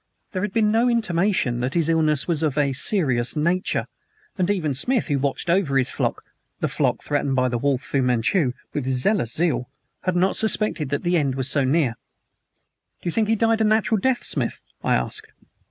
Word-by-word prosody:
There 185 - -3
had 210 0 -2
been 215 0 +2
no 230 +3 +3
intimation 185 - +1
that 125 +2 -2
his 165 -2 +2
illness 155 -3 +1
was 165 -3 0
of 150 -3 0
a 140 -2 +2
serious 130 - +2
nature, 170 +5 0 0.5
and 185 -1 0
even 170 -8 0
Smith, 225 - 0
who 140 -2 +1
watched 140 +5 -2
over 170 -6 +2
his 130 - +2
flock - - -2 0.4
the - - 0
flock - - -1
threatened 140 -2 0
by 130 -1 +2
the 120 -1 -2
wolf, 140 0 0
Fu 135 - -1
Manchu 125 - +1 0.2
with 130 -3 -1
jealous 190 - +1
zeal, 130 -8 0 0.3
had 185 -1 -1
not 185 +2 +2
suspected 215 -9 -1
that 145 - -2
the 175 0 +2
end 140 -4 0
was 130 -1 -2
so 140 0 +1
near. 135 -1 +2 1.1
"Do - - -5
you - - -1
think 220 +4 +1
he 225 - +2
died 225 0 +2
a - - +4
natural 220 0 +2
death, 260 +4 +1
Smith?" - - -3 0.2
I - - +2
asked. - - -3
160 Hz, 200 wpm, -23 LUFS, 135-200 Hz, 1.1 s, a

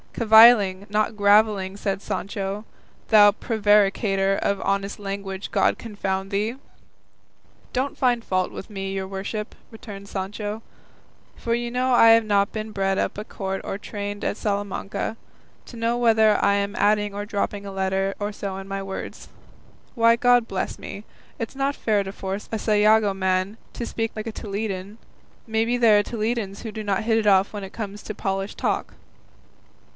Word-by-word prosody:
"Cavilling, 220 -4 +6
not 215 +1 0
gravelling," 205 -1 +3
said 195 -1 -2
Don - - -3
Quixote, 200 +1 -4 0.4
"thou 210 -2 +8
prevaricator 205 -2 +2
of 200 0 -1
honest 200 +1 -1
language, 195 -1 -5
God - - +2
confound 195 -3 -4
thee!" 210 +4 -1 1.2
"Don't 265 +2 -2
find 245 -3 +2
fault 185 -3 -1
with - - -8
me, 195 -2 -5
your 190 -1 -3
worship," 200 +3 -5 0.2
returned 200 -3 -10
Sancho, 205 +3 -4 0.7
"for 230 - -2
you 240 0 -3
know 255 +1 +1
I 230 -1 +7
have 225 0 +6
not 200 -1 +2
been 215 0 -5
bred 195 -1 0
up - - -1
at 210 - -7
court 195 -1 -4
or - - -4
trained 205 -1 -6
at - - -1
Salamanca, 205 +1 -3 0.5
to 240 - -10
know 230 +1 0
whether 220 -3 +4
I 200 0 +4
am 200 0 -1
adding 210 0 +2
or 205 0 -4
dropping 205 -1 -3
a 200 - -6
letter 195 0 -1
or 205 0 -2
so 200 -2 -5
in 195 0 -8
my 195 0 -4
words. 195 0 -7 0.7
Why! 230 -1 +5
God 245 -1 +3
bless 190 - -3
me, 200 - -8 0.4
it's 230 +3 -5
not 275 +1 0
fair 210 -3 +1
to 195 - -6
force 195 +1 -5
a 225 - -1
Sayago 215 -1 +3
man 190 +2 0 0.2
to 235 - -4
speak 225 -1 -3
like 215 +1 -5
a - - -3
Toledan; 200 -1 -5 0.5
maybe 225 +2 +1
there 220 -4 +5
are - - +1
Toledans 215 -3 -3
who 225 - -5
do 215 0 -6
not 200 0 0
hit 225 -1 +3
it 215 - -1
off 195 0 +4
when 205 -1 -5
it 195 - -9
comes 210 -2 -6
to 215 - -6
polished 195 0 -3
talk." - - -1
205 Hz, 170 wpm, -24 LUFS, 195-220 Hz, 1.2 s, thou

